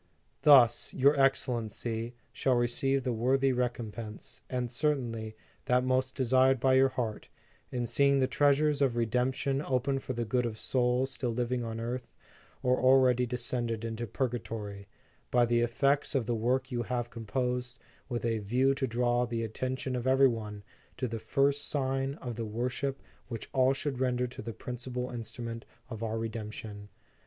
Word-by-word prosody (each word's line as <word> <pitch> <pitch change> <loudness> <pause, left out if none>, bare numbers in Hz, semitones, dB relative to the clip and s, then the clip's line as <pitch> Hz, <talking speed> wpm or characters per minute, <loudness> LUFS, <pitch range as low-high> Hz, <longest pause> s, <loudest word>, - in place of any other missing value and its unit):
"Thus, 130 -6 +6
your 140 +2 +5
Excellency 120 -3 0 0.2
shall 130 -2 +2
receive 130 +3 +1
the 125 -2 0
worthy 130 +4 +2
recompense, 115 -3 -4
and 125 -2 -2
certainly, 120 -5 -1 0.3
that 125 0 +3
most 130 0 0
desired 130 0 +3
by 130 +1 +3
your 135 +1 +5
heart, 120 -5 -3 0.4
in 120 -1 -1
seeing 140 +4 +3
the 130 - +3
treasures 145 +2 +2
of 130 -4 +2
Redemption 125 +4 0
opened 135 0 0
for 130 - -4
the 120 -1 -2
good 120 +2 +1
of 110 -2 -6
souls 125 +1 +1
still 130 -2 -2
living 120 +1 -1
on 115 -1 -4
earth, 120 +2 -5 0.5
or 125 0 +3
already 130 -1 +4
descended 120 -2 -2
into 115 +1 -4
purgatory, 110 -5 -4 0.4
by 120 -1 +4
the 120 0 +2
effects 140 +5 +1
of 130 -4 +1
the 120 - 0
work 130 +4 0
you 120 -1 -1
have 120 0 -3
composed 125 +1 -2 0.3
with 120 -2 -2
a 115 -1 +1
view 125 +6 +2
to 135 -1 -1
draw 120 +1 +1
the 115 -1 -2
atten 130 +4 -2
tion 130 0 -3
of 125 +1 -2
every 135 +1 +6
one 105 -4 -4 0.3
to 130 - -1
the 115 -1 -4
first 140 +4 +1
sign 135 -1 -1
of 120 -5 -6
the 115 - -2
wor 120 +4 -2
ship 135 +1 -3 0.2
which 115 -3 -7
all 130 0 +4
should 135 -1 -3
render 125 -1 +1
to 125 - -8
the 115 - -5
principal 125 +2 -5
instrument 115 0 -6 0.3
of 110 -1 -6
our 115 0 -2
Redemption. 110 -2 -6
125 Hz, 165 wpm, -30 LUFS, 115-130 Hz, 0.5 s, Thus